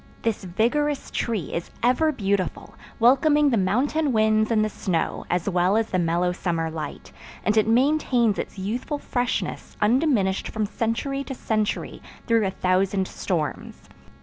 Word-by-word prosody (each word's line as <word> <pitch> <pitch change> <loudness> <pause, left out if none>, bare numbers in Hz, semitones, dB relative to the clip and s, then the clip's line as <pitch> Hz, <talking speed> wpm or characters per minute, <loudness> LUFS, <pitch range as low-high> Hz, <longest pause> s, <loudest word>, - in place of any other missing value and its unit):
This 225 -3 -1
vigorous 270 +10 0
tree 215 -10 -2
is 170 - -3
ever 255 +6 +3
beautiful, 200 - -2 0.3
welcoming 285 +5 +4
the - - +3
mountain 265 +10 +1
winds 215 -1 +3
and 215 -2 +2
the - - 0
snow 175 -5 -2
as 180 +1 -1
well 185 +2 +2
as 225 0 -1
the 185 - +1
mellow 175 +1 +1
summer 165 -3 -2
light; 155 -2 -7 0.3
and 210 - +2
it 215 -1 +3
maintains 245 -3 +2
its - - -5
youthful 230 +10 -3
freshness 245 -3 -3
undiminished 215 -4 +2
from 220 -1 -2
century 230 +6 -2
to 270 - -6
century 215 -3 -2 0.2
through 230 -4 +2
a - - 0
thousand 190 +1 +1
storms. 165 -6 -4
215 Hz, 150 wpm, -24 LUFS, 190-250 Hz, 0.3 s, welcoming